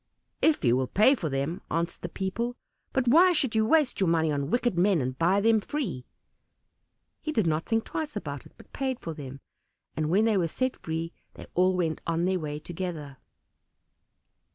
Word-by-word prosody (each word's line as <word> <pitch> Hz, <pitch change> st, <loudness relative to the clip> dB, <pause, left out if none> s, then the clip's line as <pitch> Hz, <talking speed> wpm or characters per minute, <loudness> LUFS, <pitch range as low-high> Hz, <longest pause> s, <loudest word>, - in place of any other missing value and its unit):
"If 310 Hz, -, +3 dB
you 120 Hz, 0 st, +4 dB
will 130 Hz, 0 st, 0 dB
pay 215 Hz, -, +5 dB
for 175 Hz, -, -2 dB
them," 140 Hz, +5 st, -2 dB
answered 170 Hz, +1 st, -2 dB
the 175 Hz, -, -4 dB
people; 230 Hz, +7 st, -3 dB, 0.4 s
"but 260 Hz, -2 st, 0 dB
why 350 Hz, +8 st, +6 dB
should 270 Hz, -7 st, +1 dB
you 220 Hz, -1 st, +2 dB
waste 300 Hz, -1 st, +3 dB
your 190 Hz, -3 st, +2 dB
money 160 Hz, -2 st, +2 dB
on 140 Hz, -1 st, -2 dB
wicked 240 Hz, -2 st, +1 dB
men, 185 Hz, 0 st, +3 dB
and 130 Hz, -1 st, -2 dB
buy 175 Hz, +7 st, +3 dB
them 220 Hz, 0 st, +4 dB
free." 240 Hz, -, -4 dB, 1.1 s
He 310 Hz, -, -3 dB
did 220 Hz, -, +1 dB
not 160 Hz, 0 st, 0 dB
think 225 Hz, -1 st, +1 dB
twice 310 Hz, -2 st, -4 dB
about -, -, -5 dB
it, -, -, -25 dB
but -, -, -18 dB
paid 265 Hz, -2 st, -2 dB
for 165 Hz, -, -5 dB
them, 135 Hz, -3 st, -9 dB, 0.5 s
and 155 Hz, -1 st, -1 dB
when 200 Hz, +6 st, +3 dB
they 220 Hz, -3 st, +3 dB
were 175 Hz, -3 st, +2 dB
set 255 Hz, +10 st, -1 dB
free 165 Hz, +1 st, -4 dB, 0.2 s
they -, -, -10 dB
all 185 Hz, +1 st, +3 dB
went 165 Hz, -3 st, -1 dB
on 170 Hz, +1 st, +1 dB
their 185 Hz, 0 st, +1 dB
way 150 Hz, -2 st, -4 dB
together. 160 Hz, -4 st, -6 dB
180 Hz, 195 wpm, -27 LUFS, 160-235 Hz, 1.1 s, why